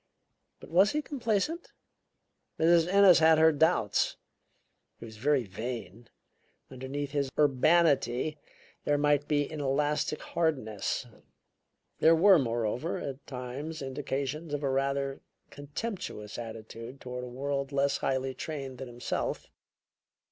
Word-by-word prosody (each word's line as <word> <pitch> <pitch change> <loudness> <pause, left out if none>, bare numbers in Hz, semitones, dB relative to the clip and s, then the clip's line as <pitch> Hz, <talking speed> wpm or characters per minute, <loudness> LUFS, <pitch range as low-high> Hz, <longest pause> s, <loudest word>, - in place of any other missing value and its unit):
But - - -13
was 190 +4 +5
he 300 0 -1
complacent? 275 - -2 0.9
Mrs. 170 +1 +4
Ennis 195 -3 +7
had 160 0 +6
her 160 +1 +6
doubts. 155 - +2 0.8
He - - -10
was 110 -1 -11
very 140 +2 +2
vain; 115 +1 -7 0.6
underneath 135 +2 -5
his 140 -2 0
urbanity 145 -1 +3 0.4
there 145 - +2
might 145 0 +2
be 145 -2 +1
an 155 -2 -5
elastic 145 +2 0
hardness. 130 - -1 0.9
There 165 +1 +6
were, 185 +1 +6
moreover, 120 +5 -1
at 135 0 -7
times 135 +5 -6
indications 140 +3 -3
of 145 - -5
a 135 - +1
rather 135 0 -1 0.3
contemptuous 145 - -6
attitude 115 +2 -8
toward 125 0 -6
a - - -6
world 140 +2 -3
less 140 0 +1
highly 130 0 -1
trained 135 -4 -6
than 135 - -6
himself. 120 0 -4
140 Hz, 120 wpm, -29 LUFS, 125-160 Hz, 0.9 s, Ennis